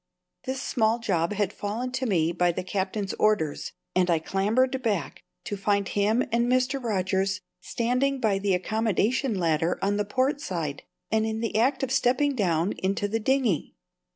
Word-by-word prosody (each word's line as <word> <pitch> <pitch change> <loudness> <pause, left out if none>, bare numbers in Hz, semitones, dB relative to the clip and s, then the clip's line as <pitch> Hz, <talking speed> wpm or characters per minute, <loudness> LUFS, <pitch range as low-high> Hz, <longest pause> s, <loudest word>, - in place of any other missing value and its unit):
This 260 +1 -3
small 225 -1 +2
job 185 -6 0
had 205 -2 -1
fallen 225 +5 -3
to 260 0 -2
me 170 -5 +2
by 175 0 +2
the 180 +2 -4
Captain's 195 +2 -2
orders, 200 -9 +1 0.2
and 185 -1 +3
I 170 - +4
clambered 225 +10 +1
back, 200 - -2 0.2
to 205 - -4
find 200 0 0
him 215 +5 +2
and 235 +1 +2
Mr. 255 +1 +1
Rogers 190 -3 0 0.2
standing 250 +4 0
by 210 -5 +1
the 195 -1 +1
accommodation 220 +5 0
ladder 165 -1 +1
on 200 +1 0
the 210 - +1
port 260 +7 0
side, 165 - -3 0.3
and 220 0 +2
in 220 0 -2
the 230 -1 -3
act 260 +5 +2
of 260 - -1
stepping 265 +2 +2
down 180 -4 +1
into 195 +2 0
the 225 +2 -1
dinghy. 245 - 0
210 Hz, 170 wpm, -26 LUFS, 190-250 Hz, 0.3 s, I